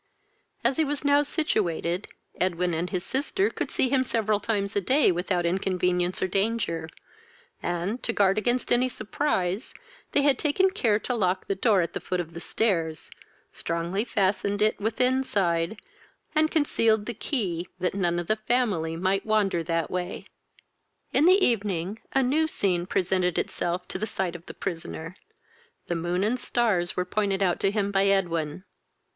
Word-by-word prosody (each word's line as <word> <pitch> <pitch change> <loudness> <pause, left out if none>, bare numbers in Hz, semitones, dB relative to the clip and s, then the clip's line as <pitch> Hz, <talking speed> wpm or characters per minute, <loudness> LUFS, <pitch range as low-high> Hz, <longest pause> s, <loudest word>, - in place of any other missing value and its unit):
As 240 +3 +2
he 320 - +4
was 290 -1 -3
now 285 0 +5
situated, 195 - -1 0.3
Edwin 180 -1 +1
and 170 +3 -2
his 180 -3 -2
sister 290 - 0
could - - -3
see - - +1
him 260 0 +2
several 215 -4 +1
times 200 -2 -1
a 200 - +2
day 265 +7 +4
without 175 0 -1
inconvenience 180 0 0
or - - +2
danger, 195 -5 -1 0.7
and, 175 +7 -2
to - - 0
guard 200 -1 +3
against 240 +3 -1
any 250 +1 +3
surprise, 215 -4 -1 0.4
they 285 - +3
had 280 -3 +3
taken 375 +6 +2
care 230 - +2
to 250 - -3
lock 185 -5 0
the - - 0
door 195 0 +3
at 170 - -3
the - - -3
foot 180 0 -3
of 165 -1 -5
the 170 - -6
stairs, 165 -6 -1 0.4
strongly 170 +5 -2
fastened 200 -2 0
it 215 +1 +2
within 250 +5 +1
side, 180 -4 0 0.5
and 310 0 +3
concealed 230 -9 +2
the 240 - -4
key, 190 - -2
that 185 0 -1
none 175 -3 0
of 175 - -2
the 215 - +2
family 215 -8 0
might 190 +3 0
wander 205 -5 +1
that 165 -1 -1
way. 180 0 -3 0.9
In 300 - +4
the 375 +2 +6
evening, 200 -3 -1
a 270 - +3
new 305 +5 +2
scene 180 - 0
presented 185 -2 +1
itself 175 +1 -2
to - - -4
the 215 - -1
fight 185 -4 -2
of 170 0 -10
the - - -8
prisoner, 165 -1 -5 0.7
The 175 - -2
moon 175 +3 -1
and 235 +5 +1
stars 210 -9 0
were 180 - +1
pointed 200 0 0
out 180 -2 +1
to 195 - +2
him 200 -1 -1
by 195 0 +3
Edwin. 175 -4 0
195 Hz, 170 wpm, -26 LUFS, 175-235 Hz, 0.9 s, the